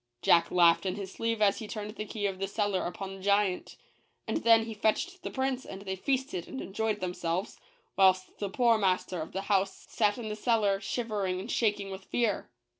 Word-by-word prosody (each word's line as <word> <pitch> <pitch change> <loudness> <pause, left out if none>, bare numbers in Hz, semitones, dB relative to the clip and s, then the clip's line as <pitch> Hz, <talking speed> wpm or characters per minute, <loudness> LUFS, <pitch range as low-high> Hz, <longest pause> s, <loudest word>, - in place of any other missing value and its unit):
Jack 170 0 +5
laughed 175 +1 +4
in 185 - -1
his 195 -2 -6
sleeve 230 0 -1
as 200 -1 +3
he 220 - -6
turned 210 -1 -5
the 215 - -5
key 210 -2 -3
of 195 -2 -2
the 195 - -1
cellar 200 -2 0
upon 190 +2 -6
the 195 - -10
giant: 200 -1 +1 0.5
and - - 0
then 230 -6 +5
he 225 - -5
fetched 285 - 0
the - - -4
prince 265 -1 -1
and 195 +1 -9
they 190 -1 -3
feasted 260 - -2
and 265 - -6
enjoyed 215 +1 -2
themselves, 180 +1 -2 0.4
whilst 185 -1 +3
the 200 - -2
poor 230 +2 +3
master 185 -3 0
of 155 - -6
the 190 - -3
house 195 -1 0
sat 210 -2 +1
in 235 -3 -5
the 210 - -3
cellar 215 -3 +2
shivering 200 -4 -2
and 190 - -5
shaking 205 -3 0
with 190 0 -8
fear. 230 -4 0
205 Hz, 205 wpm, -30 LUFS, 190-225 Hz, 0.5 s, Jack